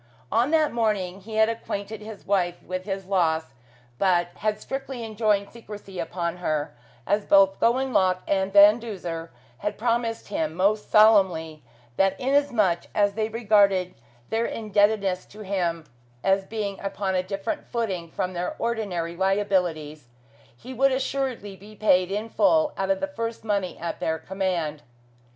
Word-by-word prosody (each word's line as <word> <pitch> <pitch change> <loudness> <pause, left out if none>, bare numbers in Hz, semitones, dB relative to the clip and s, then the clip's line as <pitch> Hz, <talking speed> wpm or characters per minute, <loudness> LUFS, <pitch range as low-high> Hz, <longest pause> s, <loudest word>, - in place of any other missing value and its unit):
On 235 +4 +2
that 310 -1 +3
morning 200 -5 -1
he 215 +3 -8
had 220 0 +5
acquainted 220 -2 -4
his 215 -1 -10
wife 180 -3 0
with 185 0 -5
his 195 -2 -4
loss, 160 -7 0 0.5
but 175 -2 +2
had 215 0 -1
strictly 270 -2 -5
enjoined 215 -2 0
secrecy 205 -5 -10
upon 170 0 -3
her, 155 -4 -2 0.3
as 205 0 +1
both 195 -1 +4
Gowanlock 230 -7 +2
and 190 0 +1
Van 205 +3 +7
Duzer 175 -7 -6 0.3
had 210 - -3
promised 230 -1 -1
him 160 -5 -2
most 205 +4 +1
solemnly 190 -8 +4 0.4
that 195 0 +2
inasmuch 255 -10 +2
as 205 -1 +3
they 215 +1 -1
regarded 200 -5 +3 0.4
their 225 +1 +1
indebtedness 205 -3 +1
to 215 - -12
him 175 -5 -2 0.4
as 195 0 +2
being 205 -2 -4
upon 195 -1 -2
a 185 - +2
different 195 - -4
footing 190 -8 -3
from 185 +3 -3
their 180 0 -3
ordinary 195 -8 -2
liabilities, 180 -7 0 0.5
he 255 - -9
should 270 +2 +3
assuredly 260 -6 -2
be 205 +3 -14
paid 185 -4 +3
in 210 +3 -2
full 305 +5 +3
out 195 -1 -2
of 195 0 +1
the 290 - 0
first 230 -6 -5
money 200 -4 -1
at 170 - -5
their 160 0 -1
command. 175 -5 -2
200 Hz, 150 wpm, -25 LUFS, 185-220 Hz, 0.5 s, Van